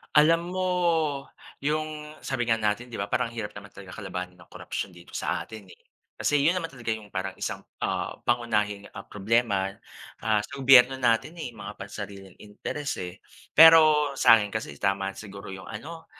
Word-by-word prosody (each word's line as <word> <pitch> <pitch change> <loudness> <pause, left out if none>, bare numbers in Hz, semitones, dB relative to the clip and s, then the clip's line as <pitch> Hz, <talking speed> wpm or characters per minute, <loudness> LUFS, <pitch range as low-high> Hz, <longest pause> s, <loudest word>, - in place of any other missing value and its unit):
Alam 165 +4 +4
mo, 185 0 0 0.9
yung 150 +1 -3
sabi 130 -3 -2
nga 115 - +3
natin 110 +2 0
di 115 -5 -6
ba, 100 - -4
parang 120 -1 0
ang - - -13
hirap 105 -2 -3
naman 100 0 -12
talaga 95 -2 -11
kalabanin 90 -3 -6
ang 90 - -16
korapsiyon 95 - -6
dito 85 0 -15
sa - - -2
atin, 110 -2 -10
eh. - - -23 0.3
Kasi 150 - +1
yun 155 +5 +3
naman 165 -3 -3
talaga 120 -5 -3
yung 110 -2 -9
parang 95 +1 -3
isang, - - -5 0.2
ah, - - -1
pangunahing, 105 -4 0
ah, 100 - -7
problema. 100 -2 +1 0.5
Ah, 110 -1 +2
sa - - -24
gobyerno 130 0 +7
natin 120 +6 +2
eh, 140 - -4
mga 105 -3 -8
pansariling 100 -1 -9
interes 125 +7 -5
eh. 90 +1 -7 0.4
Pero 155 -3 +8
sa 115 -4 +7
akin 105 -1 -3
kasi, 110 -10 -4
tama 100 +2 -1
siguro 100 -2 -9
yung 95 -1 -8
ano, 160 +9 -8
110 Hz, 180 wpm, -27 LUFS, 100-145 Hz, 0.9 s, Pero